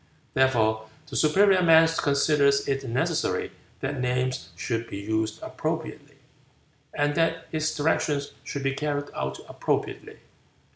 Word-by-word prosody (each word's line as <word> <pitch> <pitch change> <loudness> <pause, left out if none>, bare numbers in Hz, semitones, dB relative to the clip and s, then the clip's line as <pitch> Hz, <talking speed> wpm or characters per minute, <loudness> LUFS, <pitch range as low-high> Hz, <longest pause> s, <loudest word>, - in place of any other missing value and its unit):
Therefore 110 -4 +2 0.2
the 145 -3 -9
superior 190 +5 +4
man 165 -1 +7
considers 140 -2 +2
it 135 -2 -2
necessary 125 +3 0 0.3
that 135 -1 -2
names 125 +1 -1
should 115 -2 -3
be 100 - -5
used 110 +1 -2
appropriately, - - -5 0.7
and 145 0 0
that 165 +1 0
his 155 0 -1
directions 145 -1 0
should 140 - -5
be 135 0 +1
carried 145 0 -3
out 65 0 -4
appropriately. - - -3
140 Hz, 125 wpm, -26 LUFS, 125-155 Hz, 0.7 s, man